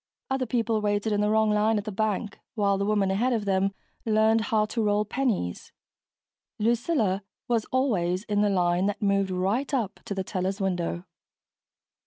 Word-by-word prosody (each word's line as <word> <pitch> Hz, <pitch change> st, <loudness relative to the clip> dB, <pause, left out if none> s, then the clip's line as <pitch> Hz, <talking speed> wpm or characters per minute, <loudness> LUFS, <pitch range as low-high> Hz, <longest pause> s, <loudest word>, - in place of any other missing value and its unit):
Other 265 Hz, -1 st, 0 dB
people 225 Hz, -2 st, 0 dB
waited 205 Hz, +1 st, 0 dB
in 205 Hz, -, +1 dB
the 210 Hz, -, +2 dB
wrong 220 Hz, 0 st, +3 dB
line 210 Hz, +1 st, +2 dB
at 205 Hz, -, -2 dB
the 215 Hz, -, -5 dB
bank 210 Hz, 0 st, -2 dB, 0.2 s
while 200 Hz, -3 st, +1 dB
the 200 Hz, -, 0 dB
woman 205 Hz, -2 st, +2 dB
ahead 240 Hz, +6 st, +1 dB
of 220 Hz, -3 st, -1 dB
them 195 Hz, 0 st, +1 dB, 0.3 s
learned 220 Hz, 0 st, +3 dB
how 220 Hz, -4 st, +2 dB
to 225 Hz, +2 st, -2 dB
roll 210 Hz, 0 st, +2 dB
pennies 215 Hz, -, -2 dB, 0.9 s
Lucilla 230 Hz, -, +1 dB, 0.3 s
was 230 Hz, -3 st, +1 dB
always 195 Hz, -9 st, 0 dB
in 205 Hz, -2 st, 0 dB
the 210 Hz, -, +3 dB
line 180 Hz, -1 st, +2 dB
that 205 Hz, +1 st, -3 dB
moved 200 Hz, -1 st, +2 dB
right 195 Hz, +10 st, -1 dB
up 235 Hz, -8 st, -1 dB
to 200 Hz, -, -4 dB
the 190 Hz, -, -2 dB
teller's 190 Hz, +2 st, -2 dB
window. 180 Hz, -2 st, -2 dB
210 Hz, 175 wpm, -26 LUFS, 195-225 Hz, 0.9 s, wrong